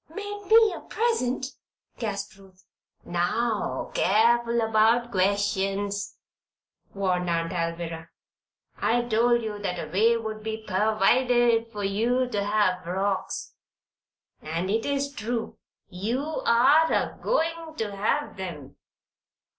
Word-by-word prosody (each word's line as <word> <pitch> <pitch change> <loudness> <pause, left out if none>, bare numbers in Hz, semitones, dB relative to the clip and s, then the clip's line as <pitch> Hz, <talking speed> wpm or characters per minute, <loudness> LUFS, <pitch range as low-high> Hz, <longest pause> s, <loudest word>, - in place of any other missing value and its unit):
"Made 410 +3 -7
me 445 -1 +6
a - - -7
present?" 425 - -1 0.5
gasped 205 -2 -4
Ruth. 190 -1 -20 0.4
"Now, 210 +6 -1
careful 235 +3 +3
about 225 +2 +3
questions," 200 +1 0 0.7
warned 180 -3 -1
Aunt 165 0 -1
Alvirah. 165 -1 -3 0.7
"I 240 +1 +2
told 240 +1 +2
you 210 -2 -4
that 185 -3 -3
a 160 - -6
way 225 +5 +3
would 220 -1 -5
be 220 0 -5
pervided 230 +3 +2
for 205 -2 -5
you 235 +6 +1
to 205 -4 -1
have 205 -3 +1
frocks. 190 +2 -2 0.9
And 165 +5 -3
it 225 +4 0
is 280 0 -1
true. 225 -1 -4 0.3
You 240 +12 -3
are 280 +7 +5
a - - -1
goin' 330 -7 -1
to 210 -7 -3
have 215 +3 -1
'em." 165 -8 -7
215 Hz, 115 wpm, -26 LUFS, 195-240 Hz, 0.9 s, me